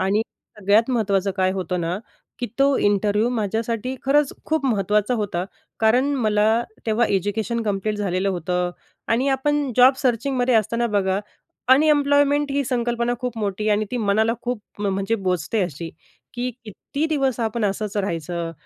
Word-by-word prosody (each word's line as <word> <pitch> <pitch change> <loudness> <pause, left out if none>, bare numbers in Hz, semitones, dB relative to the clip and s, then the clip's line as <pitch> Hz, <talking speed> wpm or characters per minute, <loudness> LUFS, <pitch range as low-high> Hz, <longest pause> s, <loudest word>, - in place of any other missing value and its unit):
आणि 195 +3 +2 0.4
सगळ्यात 210 +4 +3
महत्त्वाचं 200 -5 +1
काय 185 -1 +2
होतं 180 -1 -2
ना 170 +2 -2 0.4
की 245 - -2
तो 275 0 +4
इंटरव्ह्यू 205 +2 +2
माझ्यासाठी 230 +2 -2
खरंच 280 +1 +3
खूप 315 -3 0
महत्त्वाचा 210 0 +1
होता. 195 -5 -2 0.4
कारण 250 +6 +3
मला 220 -2 +2 0.2
तेव्हा 225 +2 +2
एज्युकेशन 205 +4 -1
कंप्लीट 210 0 -1
झालेलं 195 -1 -1
होतं. 180 0 -1 0.4
आणि 250 +5 +2
आपण 280 0 0
जॉब 255 +2 +7
सर्चिंगमध्ये 250 -1 +1
असताना 230 +2 +2
बघा, 200 -3 0 0.5
अनएम्प्लॉयमेंट 285 0 +3
ही 280 0 0
संकल्पना 240 -1 0
खूप 250 -3 -4
मोठी 210 0 -2
आणि 210 +1 +2
ती 250 - -2
मनाला 220 0 +2
खूप 245 -3 -3 0.2
म्हणजे 195 +1 0
बोचते 190 +1 -1
अशी, 165 -1 -5 0.4
की 245 +1 -2
कित्ती 275 - -4
दिवस 275 -5 0
आपण 225 0 -1
असंच 205 +1 -2
राहायचं, 170 -3 -2
220 Hz, 145 wpm, -22 LUFS, 195-250 Hz, 0.5 s, जॉब